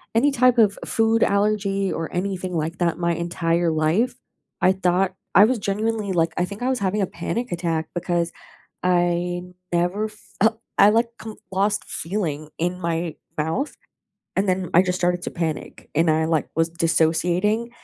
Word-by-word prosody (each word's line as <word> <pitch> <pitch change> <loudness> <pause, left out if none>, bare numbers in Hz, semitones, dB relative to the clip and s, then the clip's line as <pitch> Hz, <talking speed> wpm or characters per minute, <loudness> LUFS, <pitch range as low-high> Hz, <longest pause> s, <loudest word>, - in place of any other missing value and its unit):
any 280 +5 +4
type 255 -1 +4
of 210 -3 +4
food 225 0 +2
allergy 200 -1 +1
or 165 - -3
anything 185 -1 -2
like 165 +2 -2
that 170 -2 +1
in - - -14
my 170 0 +2
entire 170 0 0
life. 160 +11 +1 0.5
I 185 - +5
thought 185 0 +1 0.2
I 200 - +9
was 240 -1 +1
genuinely 210 0 -1
like, 165 -1 +1
I 180 - +2
think 200 +3 -9
I 255 - +1
was 255 -2 0
having 200 +1 0
a - - +3
panic 225 +7 -4
attack 165 -2 -1
because 175 -1 -1 0.5
I 175 0 +1 0.3
never 180 +5 +1
fel 220 +1 -1 0.2
I 205 - +8
like 230 +2 +2
co 220 -1 -8 0.2
lost 205 +2 +1
feeling 160 -5 -3
in 180 +2 -1
my 170 -1 -2 0.2
mouth 160 - -1 0.6
and 195 0 +1
then 185 -1 0
I 180 - +7
just 180 0 -1
started 175 0 +1
to - - -3
panic 165 -3 -4
and 165 +1 +3
I, 160 +1 +2
like, 160 -3 0
was 165 0 +2
dissociating 170 +7 +1
180 Hz, 170 wpm, -23 LUFS, 170-210 Hz, 0.6 s, I